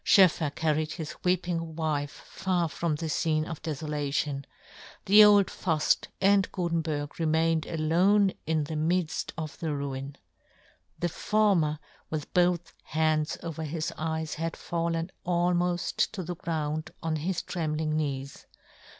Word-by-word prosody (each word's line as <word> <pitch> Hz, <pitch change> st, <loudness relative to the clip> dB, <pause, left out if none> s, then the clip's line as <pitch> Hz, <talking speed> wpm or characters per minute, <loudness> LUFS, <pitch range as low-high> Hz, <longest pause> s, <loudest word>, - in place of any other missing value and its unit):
SchoefFer 170 Hz, -7 st, +5 dB
carried 155 Hz, -1 st, 0 dB
his 160 Hz, -4 st, -5 dB
weeping 175 Hz, -3 st, 0 dB
wife 150 Hz, -3 st, -2 dB
far 185 Hz, -3 st, 0 dB
from 160 Hz, 0 st, -1 dB
this 155 Hz, 0 st, -2 dB
fcene 155 Hz, -2 st, +1 dB
of 165 Hz, -2 st, -6 dB
defolation; 150 Hz, -2 st, -2 dB, 0.6 s
the 210 Hz, +2 st, +9 dB
old 205 Hz, -1 st, +7 dB
Fuft 160 Hz, -5 st, 0 dB
and 195 Hz, 0 st, +4 dB
Gutenberg 165 Hz, -5 st, -2 dB
remained 160 Hz, 0 st, +2 dB
alone 180 Hz, +5 st, +3 dB
in 160 Hz, -1 st, +1 dB
the 155 Hz, +2 st, -5 dB
midft 160 Hz, +2 st, 0 dB
of 155 Hz, -2 st, -5 dB
the 160 Hz, -3 st, -2 dB
ruin. 140 Hz, 0 st, -4 dB, 0.8 s
The 175 Hz, -, 0 dB
former 185 Hz, -6 st, +2 dB, 0.3 s
with 155 Hz, -2 st, -4 dB
both 175 Hz, -1 st, +2 dB
hands 155 Hz, -1 st, 0 dB
over 165 Hz, -1 st, -5 dB
his 160 Hz, +2 st, -3 dB
eyes 160 Hz, 0 st, -2 dB
had 165 Hz, +1 st, -3 dB
fallen 170 Hz, 0 st, -2 dB
almoft 175 Hz, 0 st, +1 dB
to 190 Hz, -4 st, -4 dB
the 175 Hz, +1 st, -4 dB
ground 155 Hz, -2 st, -3 dB
on 160 Hz, -1 st, 0 dB
his 170 Hz, +4 st, -2 dB
trembling 155 Hz, -2 st, -2 dB
knees. 140 Hz, -3 st, -3 dB
160 Hz, 135 wpm, -28 LUFS, 155-175 Hz, 0.8 s, the